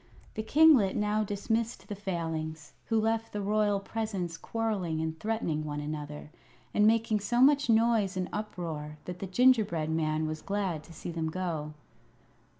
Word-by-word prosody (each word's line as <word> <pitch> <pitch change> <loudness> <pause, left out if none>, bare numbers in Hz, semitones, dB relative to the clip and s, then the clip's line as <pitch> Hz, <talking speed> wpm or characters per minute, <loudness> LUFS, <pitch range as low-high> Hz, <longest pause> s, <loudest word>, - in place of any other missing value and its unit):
The 220 - -3
kinglet 270 -5 +5
now 210 +1 +1
dismissed 220 +3 -2
the 210 - -4
Failings, 165 -5 -4
who 225 -1 +1
left 225 +1 0
the 210 - -3
royal 205 0 +2
presence 200 -5 -3
quarrelling 195 -4 -2
and 160 0 -3
threatening 210 -8 -1
one 150 -1 -4
another, 150 0 -6 0.4
and 210 0 +5
making 225 -1 +3
so 240 +4 0
much 285 0 +5
noise 225 -4 +3
and 185 -1 -1
uproar 165 -8 -5
that 180 0 -6
the 195 - -4
gingerbread 195 -8 +3
man 155 -1 0
was 155 0 -4
glad 195 -6 -2
to 165 - -13
see 170 - -6
them 165 -1 -2
go. 160 -4 -3
195 Hz, 155 wpm, -30 LUFS, 160-220 Hz, 0.4 s, kinglet